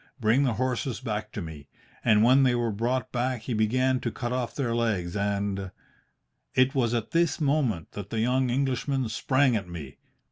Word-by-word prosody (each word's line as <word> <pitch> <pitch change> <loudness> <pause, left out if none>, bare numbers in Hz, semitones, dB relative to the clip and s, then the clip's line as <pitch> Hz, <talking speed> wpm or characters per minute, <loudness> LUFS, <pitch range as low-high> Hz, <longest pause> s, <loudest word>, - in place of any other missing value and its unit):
Bring 120 +5 +3
the 125 - +1
horses 130 0 -1
back 105 -4 -4
to 105 - -4
me. 75 -4 -9 0.4
And 105 -1 +5
when 130 +4 +6
they 125 -2 +4
were 120 -1 0
brought 120 +4 -1
back 125 -1 -1
he 125 - -3
began 130 +4 +2
to 120 - -2
cut 120 +2 -4
off 125 -2 -2
their 125 -5 -1
legs 105 -7 -1
and 100 -1 -1 0.4
' - - -44
"It 130 +1 +4
was 120 -3 +1
at 115 -2 -3
this 170 -1 +2
moment 135 - 0
that 100 -1 -7
the 110 - -2
young 125 +3 +2
Englishman 130 0 0
sprang 130 +3 +2
at 100 -5 -3
me. 75 -6 -8
120 Hz, 190 wpm, -27 LUFS, 105-130 Hz, 0.4 s, when